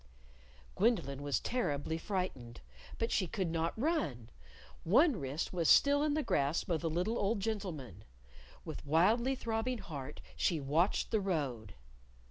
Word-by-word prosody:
_" - - -28
Gwendolyn 170 - +1
was 145 -1 0
terribly 160 - -2
frightened. 165 - -4 0.4
But 230 - -1
she 185 - +1
could 185 -1 -2
not 165 +3 -1
run. 180 - -1 0.5
One 255 - +4
wrist 140 +6 -3
was 170 -3 +1
still 285 0 +6
in 295 -1 +1
the 310 - 0
grasp 145 - 0
of 160 - +1
the 165 - -1
little 180 +8 -1
old 205 +2 +1
gentleman. 165 - -4 0.6
With - - -6
wildly 215 - +3
throbbing 235 +1 -2
heart 145 -8 -7 0.2
she 165 - +1
watched 155 +8 +1
the 220 - +2
road. 135 - -2
175 Hz, 145 wpm, -33 LUFS, 145-225 Hz, 0.6 s, still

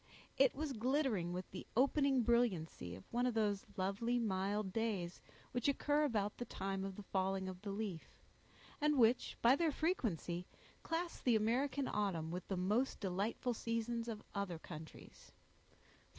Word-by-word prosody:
It 270 -1 +4
was 295 -1 -2
glittering 245 - +1
with 180 +1 -5
the 185 - -7
opening 275 -1 +4
brilliancy 190 - +1
of 95 - -11
one 245 +1 +2
of 245 - -1
those 205 -3 +1
lovely, 200 +6 0
mild 200 -2 0
days, 205 -6 -1 0.3
which 245 +1 0
occur 290 +2 +3
about 210 -6 0
the 245 - -3
time 195 -3 -3
of 195 -1 -4
the 205 - -8
falling 190 0 0
of 185 -1 -6
the 210 - -5
leaf; 195 -5 -4 0.6
and 300 -1 +3
which, 240 0 +4
by 240 +3 +7
their 325 +1 +2
frequency, 200 - -1 0.3
class 335 +1 -2
the 245 -3 +3
American 255 +5 +1
autumn 180 -6 -1
with 180 +1 -4
the 190 - -2
most 210 +9 +1
delightful 205 +6 -1
seasons 230 0 -2
of 220 -3 -5
other 200 -4 -2
countries. 160 -1 -11
215 Hz, 155 wpm, -38 LUFS, 190-250 Hz, 0.6 s, by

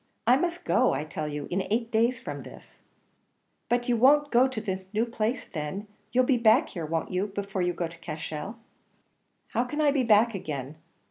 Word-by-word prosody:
I 245 +2 +6
must 345 +4 -2
go, 255 +1 +3
I - - -1
tell 155 0 -4
you, 145 -1 -4
in 190 +2 +1
eight 230 +2 0
days 230 +2 +2
from - - -6
this." - - -14 0.9
"But 245 0 +1
you 245 - +3
won't 290 +5 +5
go 250 +2 +5
to 260 -4 -4
this 190 -3 -5
new 225 +2 +2
place 230 +1 -2
then. 160 +5 -5 0.3
You'll 255 +1 +4
be 250 -1 +2
back 230 +6 +5
here, 165 -4 -5
won't 165 +1 -2
you, 185 +3 0
before 200 -1 -4
you 175 0 +1
go 170 0 -2
to 170 0 -14
Cashel?" 160 +4 -5 0.9
"How 240 - +1
can 295 +5 -5
I 295 -2 +4
be 275 -2 +2
back 230 0 +4
again? 150 -6 -5
220 Hz, 200 wpm, -27 LUFS, 175-245 Hz, 0.9 s, I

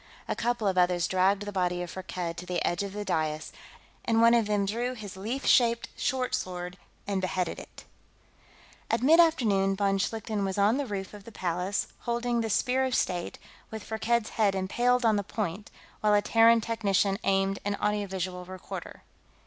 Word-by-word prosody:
A - - -1
couple 240 -2 -1
of 185 -1 +2
others 175 -1 +2
dragged 190 +2 +2
the 205 - -5
body 180 -2 -1
of 175 - -7
Firkked 180 -2 -5
to 180 - -8
the 180 -1 -1
edge 175 - 0
of 200 -1 -4
the 205 0 -5
dais, 155 -2 -2 0.5
and 225 -1 +2
one 230 +1 +6
of 230 -3 +3
them 205 -1 +1
drew 240 +5 -2
his 205 -5 -8
leaf 225 +8 -4
shaped 235 -2 +3
short 255 -1 -1
sword 180 -6 -4 0.3
and 195 -1 -1
beheaded 185 -2 -2
it. - - -12 1.1
At 230 +1 0
mid 320 +5 +6
afternoon, 210 - +3
von 195 0 +1
Schlichten 215 0 -2
was 195 0 -2
on 205 +5 +3
the 285 -2 -2
roof 195 -2 -5
of 205 -1 -11
the 230 - -11
Palace, 180 +1 -2
holding 235 0 -1
the 225 - -2
Spear 250 +5 +1
of 260 -1 0
State, 175 -1 -1 0.3
with 220 -1 -7
Firkked's 225 +1 0
head 205 -3 +1
impaled 240 +6 +1
on 220 -2 +4
the 205 - -1
point, 205 0 -4 0.3
while 210 -1 +3
a 205 - +4
Terran 230 +1 +5
technician 200 -3 +1
aimed 195 0 +1
an 205 0 -1
audio 210 0 -1
visual 185 -1 -4
recorder. 185 +1 -8
205 Hz, 190 wpm, -28 LUFS, 185-230 Hz, 1.1 s, one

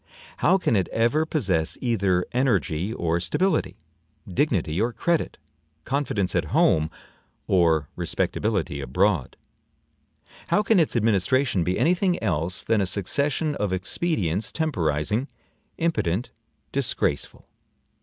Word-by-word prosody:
How 190 - +4
can 150 -11 +1
it 95 -4 +1
ever 130 +8 +1
possess 95 - 0
either 100 -7 +1
energy 105 - 0
or 85 -6 -1
stability, 180 - 0 0.5
dignity 95 - 0
or 120 +2 +1
credit, 170 +5 -1 0.5
confidence 120 - -1
at - - +1
home 80 0 +3 0.6
or 80 -5 +3
respectability 95 -10 -1
abroad? 85 +3 0 1.1
How 210 - +2
can 210 -1 +4
its 160 - +1
administration 115 0 +2
be 90 +2 -1
any 170 - +3
thing 180 -1 +1
else 90 -2 -1
than 110 -2 +2
a 95 - 0
succession 140 - -1
of 105 -8 -2
expedients 95 - -1
temporizing, 105 - -1 0.5
impotent, 125 - -1 0.4
disgraceful? - - -1
105 Hz, 115 wpm, -24 LUFS, 90-140 Hz, 1.1 s, How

